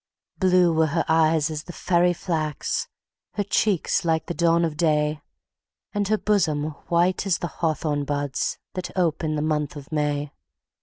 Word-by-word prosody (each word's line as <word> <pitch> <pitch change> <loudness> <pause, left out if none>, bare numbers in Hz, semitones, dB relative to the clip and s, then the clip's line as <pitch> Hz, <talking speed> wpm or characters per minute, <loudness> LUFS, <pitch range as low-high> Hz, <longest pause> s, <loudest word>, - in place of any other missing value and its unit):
Blue 180 -2 +4
were 160 0 +3
her 165 +2 0
eyes 160 -1 +3
as 155 0 -5
the 175 - -8
fairy 175 0 +2
flax, 160 -4 -2 0.5
Her 205 - 0
cheeks 200 -2 +1
like 160 -2 +1
the - - -3
dawn 170 0 +3
of 160 -2 -3
day, 150 -1 +1 0.7
And 205 -2 0
her 215 +1 +2
bosom 155 -9 +1 0.2
white 175 +3 +2
as 185 - +2
the - - -4 0.2
hawthorn 155 -3 0
buds 145 -1 -2 0.2
The 185 -1 -5
ope 165 -2 +1
in 155 -1 0
the 150 - -1
month 150 -2 -1
of 145 0 -10
May. 145 -1 -1
160 Hz, 165 wpm, -24 LUFS, 150-175 Hz, 0.7 s, Blue